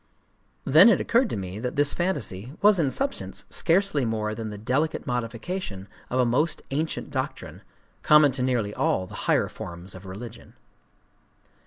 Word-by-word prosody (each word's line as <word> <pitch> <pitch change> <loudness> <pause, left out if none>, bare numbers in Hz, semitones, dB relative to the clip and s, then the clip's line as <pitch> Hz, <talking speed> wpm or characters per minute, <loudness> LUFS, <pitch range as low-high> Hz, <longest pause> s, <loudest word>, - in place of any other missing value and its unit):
Then 165 - +8
it - - +4
occurred 235 0 +2
to - - -3
me 95 +1 -6
that 125 +2 -4
this 145 0 +3
fantasy 130 - -3
was 205 -2 +6
in 150 -5 +2
substance 275 - -2
scarcely 175 -4 +2
more 110 -2 -1
than 110 0 -5
the 105 - -7
delicate 130 +9 -1
modification 120 - -4 0.2
of 130 - -1
a 125 - +4
most 145 +8 0
ancient 155 +3 -3
doctrine, - - -5 0.4
common 150 -2 +6
to 130 0 -4
nearly 120 -5 0
all 95 - 0
the - - -13 0.2
higher - - +3
forms 85 +2 -9
of 95 +1 -11
religion. 110 +5 -10
125 Hz, 160 wpm, -25 LUFS, 105-160 Hz, 0.4 s, Then